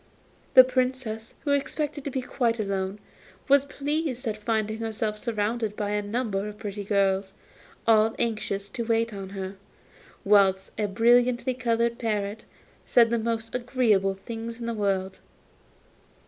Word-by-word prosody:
The 255 - +12
Princess, 255 -3 -2
who 290 - -1
expected 290 +1 -1
to - - -1
be 260 -1 -3
quite 235 -2 0
alone, 195 -1 -2 0.5
was 280 0 +5
pleased 285 -3 -2
at 215 - -1
finding 215 0 -1
herself 220 -1 -2
surrounded 220 -1 -1
by 205 -1 -2
a 210 0 0
number 205 -1 -2
of 210 0 -8
pretty 205 -1 -5
girls, 195 -1 +1 0.5
all 220 0 +4
anxious 210 -3 -2
to 235 - -4
wait 230 0 +1
on 195 -1 -6
her, 195 0 -6 0.7
whilst 195 -2 +4
a 210 -1 0
brilliantly 240 +4 +3
coloured 235 -1 0
parrot 210 -1 -2 0.4
said 235 -1 +4
the 235 - +2
most 225 0 -3
agreeable 235 -6 +2
things 230 +3 -7
in 235 - -5
the 235 - -2
world. 195 -3 -1
225 Hz, 145 wpm, -26 LUFS, 205-240 Hz, 0.7 s, The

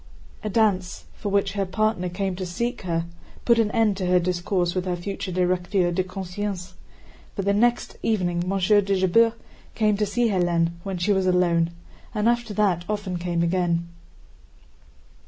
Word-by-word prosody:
A 215 - -2
dance, 195 -4 +1
for 205 - -5
which 200 0 +1
her 200 -1 -1
partner 195 -1 0
came 190 +1 -2
to 190 - -4
seek 235 +8 -3
her, 165 -3 -1 0.4
put 235 -1 +4
an 220 -2 +3
end 220 -2 +2
to 185 -2 -2
her 180 0 +4
discourse 175 0 0
with 185 -1 -2
her 180 -1 -1
future 195 +2 -5
directeur 180 0 +1
de 185 +2 0
conscience, 185 0 -5 0.6
but 195 - -3
the 200 - +3
next 240 +4 +1
evening 175 -6 0
Monsieur 195 +2 +3
de 200 0 0
Jobert 225 +5 +4 0.4
came 215 -2 +2
to 210 0 0
see 235 +3 +1
Hélène 175 -3 +1
when 195 0 -4
she 175 +4 +2
was 190 -1 +1
alone, 175 -2 +3 0.5
and 210 +1 +1
after 240 -1 +1
that 200 -5 +1
often 205 -4 -2
came 170 -1 -1
again. 170 -1 0
190 Hz, 170 wpm, -24 LUFS, 180-210 Hz, 0.6 s, put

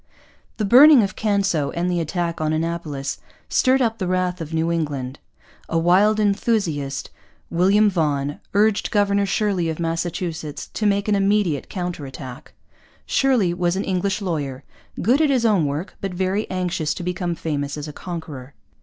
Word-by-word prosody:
The 215 - 0
burning 260 +4 +8
of 195 -2 -3
Canso 195 -8 +1
and 170 +1 -2
the 175 -1 0
attack 170 0 -2
on 155 0 0
Annapolis 155 -4 -3 0.3
stirred 260 0 +3
up 225 -2 -1
the 185 - -2
wrath 180 -1 -1
of 160 -1 -6
New 160 +1 0
England. 145 -5 -3 0.5
A 165 - 0
wild 190 +6 +4
enthusiast, 195 -10 0 0.4
William 195 +5 +4
Vaughan, 145 -6 0 0.2
urged 210 0 +2
Governor 200 -1 +2
Shirley 195 -5 0
of 160 - -4
Massachusetts 165 -2 -3
to 215 - 0
make 200 0 +1
an 210 - +2
immediate 195 -6 +1
counter 175 -6 -4
attack. 130 +1 -10 0.5
Shirley 245 -10 +2
was 175 0 0
an 195 - -1
English 190 +2 -1
lawyer, 145 -7 -3 0.4
good 250 - +3
at 305 - +3
his 255 -4 +2
own 195 -9 +3
work, 150 +7 -4
but 195 -2 -4
very 190 +3 -1
anxious 175 -4 -1
to - - -6
become 175 -1 -2
famous 145 -3 -3
as 150 0 -5
a 150 - -7
conqueror. 150 -7 -7
175 Hz, 165 wpm, -22 LUFS, 155-200 Hz, 0.5 s, burning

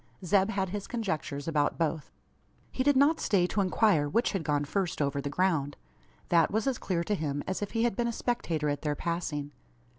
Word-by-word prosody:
Zeb 195 +2 +3
had 195 -3 -1
his 205 +1 -5
conjectures 160 - -3
about 150 -3 +1
both. 160 -2 -2 0.6
He - - -2
did 285 +1 +4
not 295 +4 +4
stay 185 -4 +2
to 200 +3 0
inquire 185 -6 +2
which 230 - +1
had 195 -5 -2
gone 145 -2 0
first 185 +3 -2
over 140 -1 0
the 140 - -3
ground. 155 -4 0 0.5
That 165 -2 +4
was 220 +1 0
as 265 -3 0
clear 170 -3 -1
to 210 - -1
him, 145 -6 -2
as 190 - -3
if 205 - -4
he 225 0 +1
had 235 -4 +1
been 235 +2 0
a - - 0
spectator 170 -11 -1
at 145 0 -1
their 150 -1 -1
passing. 150 -3 -3
175 Hz, 210 wpm, -29 LUFS, 150-210 Hz, 0.6 s, did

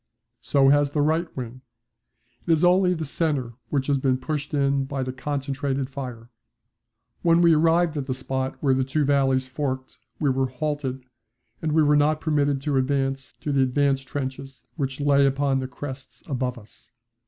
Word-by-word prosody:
So 135 -1 +3
has 145 0 +4
the 145 +1 0
right 160 +3 +1
wing. 125 0 -6 0.9
It - - +2
is 160 +2 +3
only 180 0 +4
the 160 -1 -4
centre 140 -5 -1 0.2
which 140 -2 0
has 140 -1 +1
been 130 -1 +1
pushed 150 +2 -4
in 140 -2 +1
by 135 -1 -3
the 130 0 -4
concentrated 135 0 -3
fire. 125 -3 -7 0.9
When 170 0 +4
we 170 -1 +6
arrived 165 +1 +3
at 140 -2 -3
the 130 - -1
spot 130 0 -3
where 135 -2 +4
the 130 0 +1
two 140 +3 0
valleys 135 -2 +2
forked 130 -1 -4 0.2
we 145 -3 +2
were 130 0 +1
halted, 135 0 -3 0.6
and 155 -2 -1
we 155 0 +4
were 150 0 +4
not 150 +1 +3
permitted 145 -3 +1
to 140 -1 0
advance 135 0 -1
to 150 - -2
the 140 -1 +3
advance 135 +1 +2
trenches 135 0 -6
which 135 -3 -3
lay 140 -1 +4
upon 135 0 +1
the 130 - -3
crests 130 +1 -9
above 130 -3 -2
us. 110 -1 -16
140 Hz, 175 wpm, -24 LUFS, 130-150 Hz, 0.9 s, we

